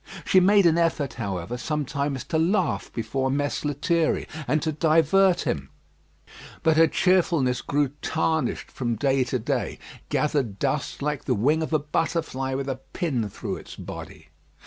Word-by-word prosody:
She 190 - +5
made 200 +1 +5
an 170 0 +4
effort, 150 -7 0
however, 95 +2 -3
sometimes 140 -2 -2
to 160 +4 -1
laugh 165 - +1
before 130 +4 -2
Mess 145 +1 -1
Lethierry 160 +3 0 0.2
and 155 - +2
to 160 - 0
divert 165 +4 +3
him; 70 -2 -2 0.9
but 160 -1 +4
her 165 +1 +6
cheerfulness 165 -8 +2
grew 145 -1 +1
tarnished 160 0 -1
from 120 -3 -2
day 135 +3 +2
to 130 - -1
day 110 - -2 0.3
gathered 140 -9 0
dust 140 +2 -2
like 150 -1 -2
the 125 - +1
wing 145 +10 +2
of 160 - -3
a 155 - +4
butterfly 150 -3 -2
with 135 0 -3
a 135 -1 -2 0.2
pin 125 -11 -1
through - - -5
its - - -11
body. - - -9
145 Hz, 155 wpm, -25 LUFS, 130-160 Hz, 0.9 s, her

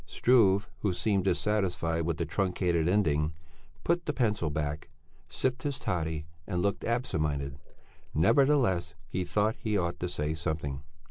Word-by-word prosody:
Struve, 105 -5 +4
who 100 -3 0
seemed 95 +2 +1
dissatisfied 90 -5 +1
with 85 -2 0
the 85 - -1
truncated 90 -1 +1
ending, 75 -6 +2 0.5
put 170 +1 0
the 150 - +1
pencil 105 - +1
back, 75 +2 -3 0.4
sipped 130 +1 -1
his 145 -4 -2
toddy 80 -3 -2 0.2
and 90 -3 -1
looked 100 0 0
absent 115 -8 -1
minded. 70 -2 -2 0.6
Nevertheless, 95 - +3
he 95 - -2
thought 105 +5 +1
he 105 -2 0
ought 85 -2 -1
to 90 - -2
say 75 -2 -1
something. 75 -3 -3
90 Hz, 145 wpm, -30 LUFS, 80-105 Hz, 0.6 s, Struve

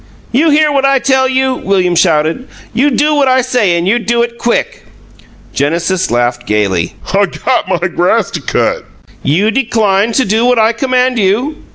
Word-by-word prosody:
"You 300 +7 +2
hear 305 0 +3
what 275 -1 0
I 275 0 +3
tell 265 0 +1
you?" 260 0 +1
William 190 -6 0
shouted. 165 +6 +1 0.3
"You 275 +4 +2
do 300 +3 +1
what 285 -2 +2
I 260 0 +3
say 240 -8 0
and 170 +1 -2
you 235 +5 +2
do 235 +1 0
it 235 0 -6
quick!" 475 - -2 0.7
Genesis 170 +6 -1
laughed 120 0 -1
gaily. 95 -5 -1 0.2
"I - - +2
got - - -2
my - - -1
grass - - 0
to - - -5
cut!" - - -1 0.4
"You 190 +10 +1
decline 220 -4 +1
to 260 - +1
do 220 +3 0
what 250 0 +2
I 220 0 +3
command 255 0 0
you?" 230 +10 0
235 Hz, 180 wpm, -12 LUFS, 180-260 Hz, 0.7 s, hear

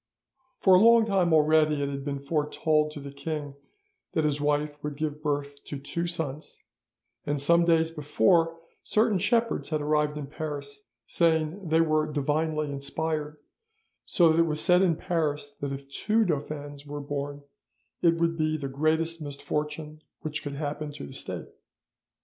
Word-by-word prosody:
"'For 190 - +5
a 185 - +8
long 230 +1 +6
time 190 -5 +2
already 155 -1 +4
it - - 0
had 140 0 -4
been 140 0 -3
foretold 150 +1 +1
to 150 - -8
the 140 0 -8
king 145 0 -5 0.6
that 160 - +1
his 150 -1 0
wife 145 0 0
would 150 -1 -4
give 150 -1 -3
birth 145 -1 -3
to 145 - -5
two 170 +5 -3
sons, 160 -3 -5 0.6
and 145 0 0
some 170 +4 +4
days 165 -1 +3
before, 165 +2 +2 0.2
certain 215 -3 +2
shepherds 230 +4 +1
had 155 -1 0
arrived 150 0 +1
in 150 - -4
Paris, 140 -1 -6 0.2
saying 165 +2 +1
they 160 +1 +4
were 155 -1 +1
divinely 150 +1 0
inspired, 150 +2 -3 0.7
so 170 -2 +4
that 160 - +2
it 165 - +4
was 155 -1 -2
said 180 +2 +4
in 180 -4 +3
Paris 150 -4 -2
that 140 -1 -2
if 135 0 -6
two 215 +10 +1
dauphins 145 -3 -4
were 145 0 -6
born 145 0 -4 0.6
it 170 -1 +4
would 165 0 +1
be 155 -1 0
the 140 -2 -4
greatest 160 +4 0
misfortune 150 +1 -4 0.2
which 150 -1 -4
could 145 -1 -5
happen 150 0 -4
to 70 - -7
the - - -10
State. - - -5
150 Hz, 165 wpm, -27 LUFS, 145-165 Hz, 0.7 s, a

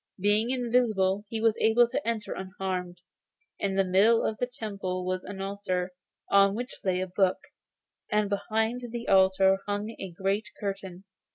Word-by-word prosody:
Being 210 +4 +2
invisible, 230 -6 +1
he 225 - -3
was 225 -1 +3
able 235 +2 +5
to 255 +2 -3
enter 225 -3 -2
unharmed. 185 -2 -5 0.6
In 195 -1 -1
the 195 - +4
middle 200 +5 +4
of 215 - -2
the 245 - 0
temple 200 -7 -4
was 185 0 -2
an 200 0 -8
altar, 195 -2 -2 0.4
on 200 0 +5
which 245 +3 -6
lay 185 -1 +1
a - - 0
book, 185 0 +2 0.7
and 210 0 +2
behind 220 +4 -1
the 235 0 -6
altar 190 0 +5
hung 205 +2 -2
a 190 - -5
great 195 +4 -2
curtain. 195 -2 -5
200 Hz, 160 wpm, -28 LUFS, 190-220 Hz, 0.7 s, able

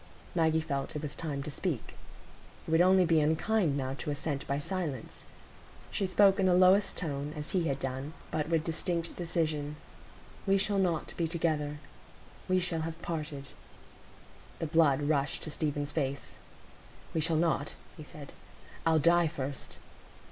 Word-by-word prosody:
Maggie 160 -2 +3
felt 140 -1 -3
it 150 - -3
was 150 - -3
time 145 -4 -3
to 150 - -5
speak; 150 - -3 0.7
it - - -3
would 160 +1 +5
only 185 0 +6
be 165 -2 +4
unkind 160 +1 +2
now 130 -1 -2
to 140 - -5
assent 145 -1 -3
by 140 - 0
silence. 150 - -4 0.7
She 195 - 0
spoke 195 +1 +5
in 190 - +4
the 180 - +5
lowest 185 +2 +5
tone, 145 -2 -3
as 150 0 -6
he 180 -3 +1
had 140 -4 0
done, 135 +3 -4 0.2
but 155 0 -1
with 165 -2 +2
distinct 165 +1 -2
decision. 155 -4 -1 0.7
"We 195 0 +5
shall 200 0 +1
not 175 -5 0
be 170 - +1
together; 155 -3 0 0.7
we 185 0 +4
shall 175 -3 -1
have 160 0 -4
parted." 150 -4 -4 1.1
The - - -2
blood 150 -3 +4
rushed 145 -1 +1
to 155 - -4
Stephen's 145 -1 -2
face. 140 -3 -3 0.8
"We 160 - +1
shall 165 0 +3
not," 160 -3 +1 0.2
he - - -10
said. 150 -1 -10 0.5
"I'll 160 -1 +5
die 170 +2 +5
first." 140 -2 -4
160 Hz, 160 wpm, -31 LUFS, 145-170 Hz, 1.1 s, only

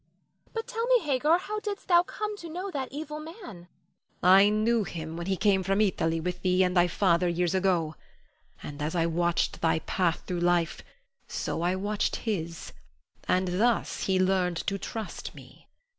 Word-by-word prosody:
But 455 -1 -3
tell 465 -1 -3
me, - - +4
Hagar, 295 +3 +3
how 425 +4 -4
didst 410 -1 -5
thou 345 -2 +6
come 420 +3 -4
to 340 -4 -9
know 365 +4 -5
that 270 -4 -4
evil 300 +1 -6
man? 320 +2 -9
Hagar. 175 - -11 0.5
I 190 +3 +7
knew 215 +2 +2
him 160 -3 -6
when 170 +1 -5
he 190 -1 0
came 200 -2 +3
from 195 +2 0
Italy 165 -6 +1
with 180 +2 -4
thee 185 0 +3
and 180 0 0
thy 175 0 +5
father 175 0 +2
years 175 0 0
ago. 180 -5 +1 0.7
And 145 0 -7
as 155 +4 -2
I 165 -1 +2
watched 170 +1 0
thy 160 -1 +3
path 170 +1 -1
through 180 -1 -3
life 175 -2 +1 0.5
so - - -3
I 175 +2 +1
watched 205 +2 -1
his, 170 -7 -4 0.5
and 180 0 +1
thus 235 -1 +1
he 190 -1 +2
learned 185 -2 +2
to 200 -1 -1
trust 220 +1 -6
me. - - -15
190 Hz, 180 wpm, -28 LUFS, 175-260 Hz, 0.7 s, I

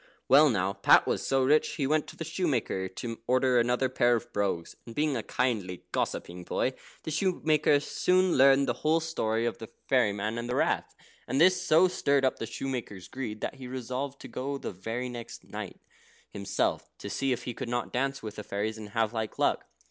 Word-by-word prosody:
Well, 145 +3 +7
now 100 -4 0
Pat 100 - +5
was - - -1
so 135 -1 +2
rich, 150 +4 +3
he 140 - -1
went 150 +2 +1
to - - -10
the - - -5
shoemaker 145 - -1
to 115 +5 -6
order 130 0 +3
another 125 +2 +2
pair 120 -1 +3
of 120 +1 -5
brogues, 95 -5 -1
and 115 - -11
being 150 -2 +1
a 115 - -1
kindly, 105 -8 -2
gossiping 90 +1 -3
boy, - - -1 0.3
the 160 - -4
shoemaker 155 -3 +2
soon 185 +4 +2
learned 135 +1 +6
the 120 - +1
whole 160 +2 +3
story 115 -9 -1
of 120 - -2
the 115 - -8 0.2
fairy 125 -6 +3
man 105 +3 -3
and 120 +1 -5
the 125 - -1
Rath. - - 0 0.3
And 130 +3 0
this 180 +2 +5
so 175 +1 +5
stirred 140 -6 +1
up 130 - 0
the 115 - -3
shoemaker's 115 -10 -5
greed 110 -4 -6
that - - -2
he 130 -2 -8
resolved 130 +2 -4
to - - -8
go 140 +2 -4
the - - -5
very 115 +7 -4
next 120 -2 -8
night - - -7 0.5
himself, 100 -1 -1
to - - -8
see 135 +6 -1
if 125 -1 -1
he 120 - -4
could 120 - -6
not 120 0 -2
dance 135 +1 -1
with 105 -1 -7
the 105 - -5
fairies, 105 +2 -3
and 105 -1 -8
have 110 0 +2
like 110 -2 -3
luck. - - +1
125 Hz, 210 wpm, -29 LUFS, 110-140 Hz, 0.5 s, Well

